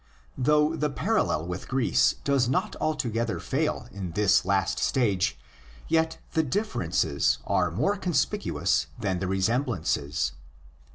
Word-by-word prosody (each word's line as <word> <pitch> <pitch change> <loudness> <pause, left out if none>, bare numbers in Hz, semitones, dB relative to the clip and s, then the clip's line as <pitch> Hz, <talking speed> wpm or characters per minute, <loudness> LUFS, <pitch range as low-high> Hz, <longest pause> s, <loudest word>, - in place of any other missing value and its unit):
Though 150 +4 +3
the 150 -1 0
parallel 190 - 0
with 90 +1 -5
Greece 130 -2 +2
does 140 -4 +2
not 185 +11 0
altogether 115 -7 -1
fail - - -1
in 95 -4 -6
this 100 0 +3
last 95 0 +1
stage, 100 - +1 0.5
yet 160 0 +1 0.2
the 160 - +3
differences 95 - 0
are 90 -2 +1
more 195 - 0
conspicuous 155 - 0
than 95 -4 -1
the 95 - -2
resemblances. 95 - 0
115 Hz, 120 wpm, -27 LUFS, 95-150 Hz, 0.5 s, Though